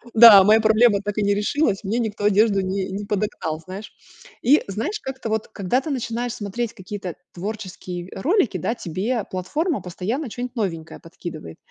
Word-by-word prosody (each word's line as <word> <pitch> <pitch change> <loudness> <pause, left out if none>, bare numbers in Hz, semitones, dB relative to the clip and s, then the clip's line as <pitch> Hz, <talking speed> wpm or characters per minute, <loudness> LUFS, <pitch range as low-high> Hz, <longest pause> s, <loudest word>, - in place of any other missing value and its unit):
Да, 220 -4 +11
моя 220 +1 +6
проблема 220 -1 +4
так 205 +1 -4
и 210 - +1
не 200 0 +3
решилась, 210 -1 0
мне 220 +5 -1
никто 215 -3 -3
одежду 205 0 +4
не 190 0 -2
не 200 +2 -4
подогнал, 195 -6 -2
знаешь. 185 +5 -9 0.5
И, 280 +6 +4
знаешь, 280 - -3
как-то 265 -3 -6
вот, 220 0 -2
когда 215 +5 0
ты 310 - -6
начинаешь 240 -2 -2
смотреть 225 +3 -4
какие-то 190 -3 -7 0.2
творческие 185 -2 -6
ролики, 270 - +1
да, 225 +8 -2
тебе 205 +5 -2
платформа 295 - -1
постоянно 220 - -3
чё-нибудь 245 +2 -6
новенькое 165 -8 -3
подкидывает. 165 - -9
210 Hz, 165 wpm, -22 LUFS, 190-235 Hz, 0.5 s, Да